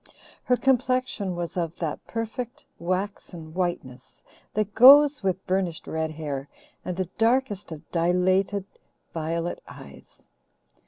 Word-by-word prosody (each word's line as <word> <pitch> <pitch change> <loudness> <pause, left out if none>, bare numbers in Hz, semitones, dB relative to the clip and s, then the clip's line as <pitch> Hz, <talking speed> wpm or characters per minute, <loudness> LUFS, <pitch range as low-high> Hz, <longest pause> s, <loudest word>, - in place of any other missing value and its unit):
Her 250 - +3
complexion 255 -7 +1
was 175 -1 -4
of 170 -2 -2
that 160 -4 -4
perfect, 230 +2 -5
waxen 180 -3 -4
whiteness 160 -8 -4 0.3
that 210 -1 -1
goes 285 +4 +8
with 190 -1 -1
burnished 185 -3 -1
red 160 0 -2
hair 145 -3 -5 0.3
and 180 -1 -4
the 185 -2 -1
darkest 225 -5 +1
of 155 0 -9
dilated 185 +3 +2 0.5
violet 165 +1 -3
eyes. 70 -1 -14
185 Hz, 115 wpm, -26 LUFS, 165-220 Hz, 0.5 s, goes